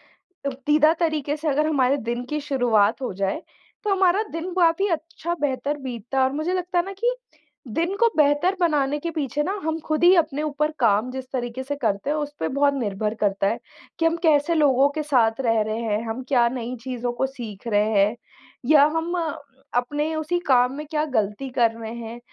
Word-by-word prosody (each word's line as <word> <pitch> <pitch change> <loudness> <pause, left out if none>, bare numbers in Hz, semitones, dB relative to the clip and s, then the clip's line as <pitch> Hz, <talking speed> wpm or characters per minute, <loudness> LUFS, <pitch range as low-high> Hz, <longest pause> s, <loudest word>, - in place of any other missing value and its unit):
पसंददीदा 300 -1 +1
तरीक़े 305 -3 0
से 310 - -5
अगर 300 +2 +1
हमारे 275 -2 +2
दिन 240 0 -3
की 300 0 -1
शुरुआत 245 -5 +2
हो 250 - -3
जाए 195 - -2 0.4
तो 420 - -1
हमारा 385 +2 +3
दिन 330 +3 -4
काफ़ी 360 +2 +3
अच्छा 335 +1 -3
बेहतर 285 +1 -1
बीतता 250 -1 -6
है। 260 - +5
और 260 - +2
मुझे 310 +5 -1
लगता 360 -1 -2
है 345 - 0
ना 390 - -6
कि - - +2 0.5
दिन 335 - -1
को 470 - +5
बेहतर 295 +6 +3
बनाने 295 -4 +1
के 335 - -3
पीछे 295 -2 -2
ना 375 - -2
हम 320 0 -1
खुद 310 +2 -1
ही 360 +2 +8
अपने 305 -4 +1
ऊपर 300 +1 -1
काम 225 +1 +3
जिस 260 0 -6
तरीक़े 250 0 -3
से 285 +2 -3
करते 220 -2 -1
हैं 305 - +1
उसपे 295 0 -3
बहुत 280 +1 +2
निर्भर 215 -4 -2
करता 195 -1 +1
है 230 +4 -1 0.4
कि 330 - +2
हम 330 0 +3
कैसे 305 +1 +3
लोगों 280 -3 +4
के 305 +1 -3
साथ 245 -5 +2
रह 225 -3 +2
रहे 215 +1 -2
हैं? 220 -2 -1
हम 225 +4 -3
क्या 245 -3 +4
नई 245 0 -4
चीज़ों 245 -2 -3
को 255 - 0
सीख 240 -5 -8
रहे 210 -1 +2
हैं? 210 +4 +3 0.5
या 290 0 +6
हम 330 +2 -1 0.6
अपने 295 +6 0
उसी 315 +3 -1
काम 250 -1 +4
में 300 +1 -6
क्या 305 -1 +1
ग़लती 250 -1 -1
कर 230 -2 +4
रहे 225 0 -6
हैं? 235 0 -7
280 Hz, 200 wpm, -23 LUFS, 240-310 Hz, 0.6 s, ही